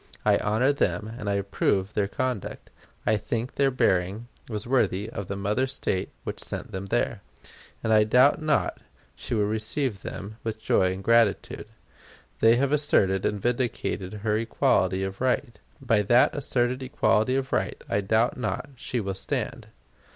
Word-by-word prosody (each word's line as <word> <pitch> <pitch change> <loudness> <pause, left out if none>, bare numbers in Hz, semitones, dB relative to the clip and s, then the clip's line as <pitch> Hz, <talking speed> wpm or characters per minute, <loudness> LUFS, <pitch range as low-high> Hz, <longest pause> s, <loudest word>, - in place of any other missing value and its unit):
I - - +5
honor 120 +7 +2
them, 105 -3 -1
and 110 -4 -4
I 100 - +1
approve 100 0 0
their 100 -2 +1
conduct. 125 -1 -4 0.3
I 110 - +3
think 115 +4 -3
their 140 -1 +2
bearing 100 -2 0 0.2
was 105 -3 -4
worthy 110 -6 +1
of 100 -5 -5
the 100 - -3
mother 105 +7 0
State 95 -8 -2
which - - -5
sent - - -5
them 95 +1 -5
there; 120 -1 0 0.6
and 110 - +2
I 105 0 +6
doubt 125 +8 +4
not 155 -1 0 0.4
she - - -4
will 105 -2 +2
receive 110 +1 -1
them 105 +3 -7
with 110 -1 -4
joy 95 -3 +2
and 95 +1 -6
gratitude. 115 -1 +2 0.7
They 115 +1 +6
have 135 +2 +1
asserted 105 -11 +2
and 105 - -2
vindicated 120 -5 -2
her 105 0 +2
equality 95 -4 +1
of 95 +2 -5
right. 130 -1 0 0.2
By 115 -5 +2
that 120 +5 +4
asserted 125 -2 0
equality 130 -2 +1
of 135 0 -2
right - - -1
I 100 - 0
doubt 110 +6 +1
not 125 +2 -3
she 125 0 -3
will 100 -3 -2
stand. 95 - -4
110 Hz, 165 wpm, -26 LUFS, 100-125 Hz, 0.7 s, I